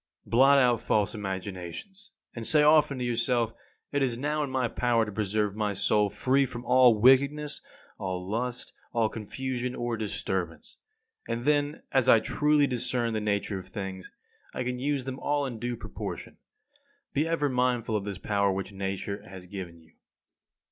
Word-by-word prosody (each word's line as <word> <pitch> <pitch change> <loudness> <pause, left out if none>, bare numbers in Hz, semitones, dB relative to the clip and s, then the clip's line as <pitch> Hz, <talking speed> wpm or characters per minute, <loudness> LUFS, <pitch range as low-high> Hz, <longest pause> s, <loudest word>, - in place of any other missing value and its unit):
29. - - -18
Blot 135 +4 +6
out 125 -4 +4
false 105 0 +1
imaginations, 95 - -6 0.3
and 115 -1 -4
say 150 -1 +5
often 150 -2 +5
to 125 - -3
yourself: 120 -1 0 0.4
It 145 - 0
is 125 -3 +1
now 150 +4 -1
in 145 - -2
my 130 -2 0
power 115 -1 +1
to 105 - -6
preserve 105 0 -1
my 105 -2 -1
soul 105 +2 +2
free 135 +5 +2
from 120 0 -8
all 125 -3 +5
wickedness, 140 +5 +4 0.4
all 90 -1 -4
lust, 120 +4 -3 0.2
all 115 -2 +2
confusion 125 +3 -4
or 120 -1 -2
disturbance. 95 -5 -3 0.5
And 120 +1 -3
then, 145 0 +1
as 130 -2 +3
I 115 - +8
truly 150 +5 +2
discern 120 -2 0
the 110 - -1
nature 100 -1 -1
of 95 - -11
things, 95 -3 -6 0.5
I - - -1
can 125 0 -3
use 140 -1 -1
them 130 0 -5
all 145 0 0
in 120 -4 -5
due 120 +1 -3
proportion. - - -7 0.8
Be 150 +3 +1
ever 165 -3 +1
mindful 125 -4 0
of 105 - 0
this 100 -2 -5
power 100 0 +1
which 95 0 -3
Nature 95 +1 -3
has 95 -2 -10
given 90 -3 -7
you. 80 -1 -21
120 Hz, 170 wpm, -28 LUFS, 100-130 Hz, 0.8 s, I